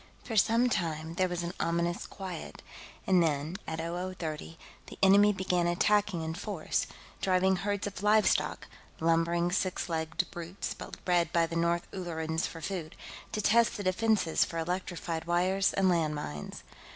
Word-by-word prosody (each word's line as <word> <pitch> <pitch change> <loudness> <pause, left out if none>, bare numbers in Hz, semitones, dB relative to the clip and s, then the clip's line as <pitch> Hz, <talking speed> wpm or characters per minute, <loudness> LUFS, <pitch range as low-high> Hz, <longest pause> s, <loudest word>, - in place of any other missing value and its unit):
For 225 - -5
some 230 +4 +4
time, 160 -7 -2
there 185 +1 +1
was 175 -1 -2
an 170 +1 -4
ominous 170 +1 0
quiet, 185 -4 -7 0.4
and 185 -2 +4
then, 155 +2 0
at 160 - -3
0030, 170 -1 -4 0.3
the - - -10
enemy 200 +2 +7
began 180 -3 0
attacking 200 0 +2
in 160 0 -3
force, 175 -1 -2 0.3
driving 190 0 +3
herds 205 +2 -2
of 200 -2 -5
livestock 210 +1 +3 0.3
lumbering 165 +1 +2
six 185 -1 -1
legged 165 +1 -1
brutes 175 +3 -5 0.3
bred 175 -2 +2
by 170 -1 +3
the 165 - -6
North 170 +1 +1
Ullerans 160 -3 -2
for 165 - -9
food 170 -3 -4 0.4
to 215 - -1
test 230 +3 +4
the 205 - -4
defenses 190 -2 +2
for 165 - -5
electrified 170 -1 -3
wire 180 +3 +1 0.2
and 195 -1 +4
land 165 -4 +2
mines. 75 - -6
175 Hz, 150 wpm, -30 LUFS, 165-190 Hz, 0.4 s, enemy